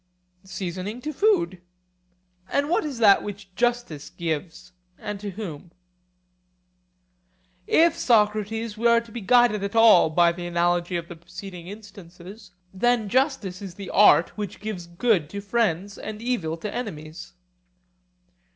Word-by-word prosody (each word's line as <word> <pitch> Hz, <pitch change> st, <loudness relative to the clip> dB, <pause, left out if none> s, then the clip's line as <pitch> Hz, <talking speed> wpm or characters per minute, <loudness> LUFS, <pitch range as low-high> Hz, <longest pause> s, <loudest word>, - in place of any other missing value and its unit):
Seasoning 190 Hz, +4 st, -5 dB
to 305 Hz, +2 st, -5 dB
food. 345 Hz, -, +1 dB, 0.9 s
And 285 Hz, +1 st, 0 dB
what 350 Hz, -, +2 dB
is 290 Hz, -5 st, -5 dB
that 210 Hz, -4 st, +6 dB
which 205 Hz, -2 st, -9 dB
justice 240 Hz, -9 st, -1 dB
gives, 165 Hz, +1 st, -5 dB, 0.3 s
and 205 Hz, -1 st, -6 dB
to 205 Hz, 0 st, -5 dB
whom? 180 Hz, -5 st, -7 dB, 2.0 s
If, 330 Hz, 0 st, +4 dB
Socrates, 215 Hz, -1 st, +1 dB
we 230 Hz, +2 st, +1 dB
are 235 Hz, 0 st, +5 dB
to 230 Hz, -1 st, -13 dB
be 235 Hz, -, -6 dB
guided 215 Hz, -1 st, +3 dB
at 200 Hz, +2 st, -4 dB
all 225 Hz, -7 st, +6 dB
by 170 Hz, +2 st, +4 dB
the 175 Hz, 0 st, -6 dB
analogy 175 Hz, +1 st, 0 dB
of 170 Hz, 0 st, -6 dB
the 175 Hz, -, -9 dB
preceding 175 Hz, +1 st, -10 dB
instances, 195 Hz, -1 st, -12 dB, 0.2 s
then 230 Hz, +1 st, +1 dB
justice 255 Hz, -, 0 dB
is 190 Hz, -3 st, -8 dB
the 200 Hz, 0 st, -8 dB
art 205 Hz, -, +5 dB
which 205 Hz, -2 st, -6 dB
gives 195 Hz, -4 st, -6 dB
good 170 Hz, -3 st, +1 dB
to 200 Hz, -, -6 dB
friends 200 Hz, -3 st, -1 dB
and 215 Hz, -1 st, -7 dB
evil 215 Hz, -10 st, -2 dB
to 205 Hz, +5 st, -6 dB
enemies. 175 Hz, -6 st, -7 dB
200 Hz, 140 wpm, -24 LUFS, 175-230 Hz, 2.0 s, that